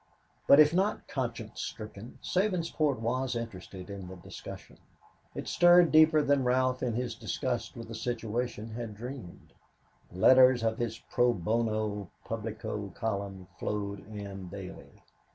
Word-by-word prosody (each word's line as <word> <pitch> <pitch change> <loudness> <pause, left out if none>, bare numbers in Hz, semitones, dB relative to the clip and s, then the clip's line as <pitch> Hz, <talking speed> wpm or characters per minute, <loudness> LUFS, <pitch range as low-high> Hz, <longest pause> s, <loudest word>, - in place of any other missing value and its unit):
But 140 - +8
if 155 +1 +7
not 195 +4 0
conscience 115 -4 -4
stricken, 110 +1 -7
Sabinsport 170 - +1
was 125 +3 -1
interested 95 -5 -6
in 95 -2 -7
the 95 - -8
discussion. 90 - -10 0.6
It - - -5
stirred 175 -1 +6
deeper 155 -1 +6
than 140 -1 +3
Ralph 130 +1 +2
in 120 -3 -1
his 120 -1 -2
disgust 120 +1 -3
with 115 - -7
the 115 - -7
situation 115 -1 -3
had 115 -2 -5
dreamed. 120 -5 -9 0.6
Letters 130 +7 +6
to 115 -1 +1
his 115 -1 -3
Pro 125 -1 +1
Bono 110 0 -1 0.2
Publico 110 -2 -4
column 100 -4 -3
flowed 100 -2 -3
in 100 -3 -7
daily. 95 -1 -9
115 Hz, 135 wpm, -30 LUFS, 105-130 Hz, 0.6 s, But